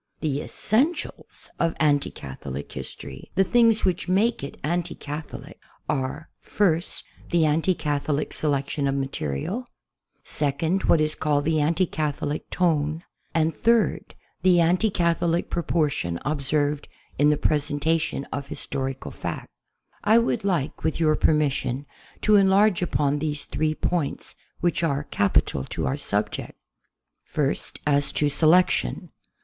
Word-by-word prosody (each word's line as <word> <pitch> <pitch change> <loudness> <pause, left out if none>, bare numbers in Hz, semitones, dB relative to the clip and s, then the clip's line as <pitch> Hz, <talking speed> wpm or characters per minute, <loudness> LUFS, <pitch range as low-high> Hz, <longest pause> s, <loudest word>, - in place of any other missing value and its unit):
The 145 -2 -1
essentials 270 - -1
of 165 -1 +1
anti 145 -2 +3
Catholic 70 +1 -7
history, 65 -2 -8
the 195 - +5
things 230 +1 +4
which 180 -1 0
make 200 +1 +2
it 140 - -6
all 150 - 0
anti 175 -1 -1
Catholic, 150 +2 -8 0.3
are, 145 +2 -2
first, 175 -5 0 0.3
the 170 -2 +3
anti 160 +4 +2
Catholic 145 -1 -1
se 155 - -2
lection 140 0 0
of 135 - 0
material; 135 - -3 0.6
second, 160 +6 -1
what 160 - +4
is 155 0 +1
called 145 -2 0
the 160 0 +2
anti 165 +5 +2
Catholic 150 -2 -3
tone; 160 -2 0 0.3
and 160 -1 +2
third, 230 +4 +1 0.3
the 180 -2 +5
anti 180 +6 +3
Catholic 170 -2 0
proportion 150 - 0
ob 150 0 -1
served 145 +1 0 0.3
in 145 +1 +5
the 150 - +3
presentation 150 0 0
of 140 0 -4
historical 135 0 -4
fact. - - -5 0.5
1 225 +3 +5
would 235 - -1
like, 175 -8 -1
with 160 - 0
your 155 -2 +3
permission, 145 -4 +1 0.4
to 215 -1 +5
enlarge 195 0 +4
upon 145 -4 +1
these 150 -1 -3
three 155 0 -1
points 165 -4 -2 0.3
which 175 0 +1
are 145 -3 0
capital 95 - +1
to - - -4
our 65 - 0
subject. - - -2 0.7
First, 145 -2 -2
as 145 -1 +2
to 150 - +2
selection. 155 - +3
155 Hz, 135 wpm, -25 LUFS, 145-175 Hz, 0.7 s, the